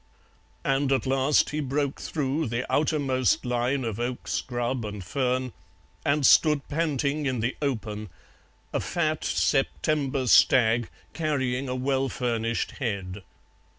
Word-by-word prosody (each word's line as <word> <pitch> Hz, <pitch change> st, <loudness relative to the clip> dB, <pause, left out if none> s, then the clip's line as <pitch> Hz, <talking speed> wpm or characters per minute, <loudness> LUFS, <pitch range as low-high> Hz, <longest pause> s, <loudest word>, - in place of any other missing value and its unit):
And 135 Hz, 0 st, +1 dB
at 135 Hz, -, +1 dB
last 135 Hz, +2 st, +2 dB
he 150 Hz, -, -2 dB
broke 140 Hz, 0 st, -2 dB
through 150 Hz, 0 st, -1 dB
the 120 Hz, +2 st, -2 dB
outermost 135 Hz, -, +1 dB
line 125 Hz, +2 st, 0 dB
of 115 Hz, -2 st, -3 dB
oak 120 Hz, +1 st, -3 dB
scrub 120 Hz, 0 st, -2 dB
and 105 Hz, -2 st, -6 dB
fern 130 Hz, +4 st, -1 dB, 0.5 s
and 140 Hz, 0 st, +2 dB
stood 150 Hz, +1 st, +5 dB
panting 145 Hz, -2 st, -1 dB
in 130 Hz, -3 st, -1 dB
the 120 Hz, +3 st, -1 dB
open, 110 Hz, -7 st, -3 dB, 0.6 s
a -, -, +1 dB
fat 155 Hz, -2 st, -1 dB
September 140 Hz, -1 st, 0 dB
stag 120 Hz, -1 st, +5 dB, 0.2 s
carrying 135 Hz, -5 st, -1 dB
a 125 Hz, -, -2 dB
well 135 Hz, +1 st, 0 dB
furnished 115 Hz, -2 st, -1 dB
head. 100 Hz, -5 st, -3 dB
130 Hz, 125 wpm, -26 LUFS, 120-140 Hz, 0.6 s, stood